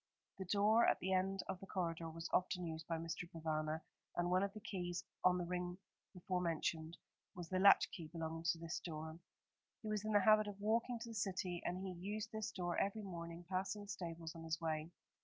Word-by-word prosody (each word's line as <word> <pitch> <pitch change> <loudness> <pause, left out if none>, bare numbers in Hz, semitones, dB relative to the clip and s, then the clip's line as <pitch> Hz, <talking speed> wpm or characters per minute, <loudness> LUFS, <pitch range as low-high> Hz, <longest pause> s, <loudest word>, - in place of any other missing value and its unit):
The 190 - -3
door 210 +5 +5
at - - +5
the 190 +1 0
end 190 +1 +2
of 190 -1 -3
the 195 - -9
corridor 165 -3 -1
was 165 +1 -5
often 180 -1 +2
used 160 0 -5
by 165 - 0
Mr. 165 +1 -4
Provana, 155 -1 -1 0.3
and 175 0 +1
one 185 +1 +5
of 200 0 +1
the 215 - -6
keys 185 -5 -3 0.2
on 180 0 +6
the 175 - -1
ring 180 0 -2 0.3
before 180 -1 -1
mentioned 165 -1 -1 0.4
was 175 -2 -6
the 185 - +1
latch 200 +1 +8
key 165 -3 -6
belonging 165 0 -4
to 170 0 +3
this 165 0 -3
door. 160 -1 -5 0.6
He 215 - -3
was 210 -1 0
in 215 0 0
the 205 - +7
habit 215 +1 +6
of 205 -1 -6
walking 230 +4 +2
to 230 0 -6
the - - -6
City, 185 -4 -1
and 180 - -1
he 190 - -2
used 205 +5 -4
this 220 0 -2
door 175 -2 -1
every 205 +2 0
morning, 170 -2 -6
passing 190 +3 -1
the 205 - -12
stables 165 -4 -4
on 165 -1 -8
his 160 0 -1
way. 160 -1 -1
180 Hz, 215 wpm, -40 LUFS, 165-200 Hz, 0.6 s, latch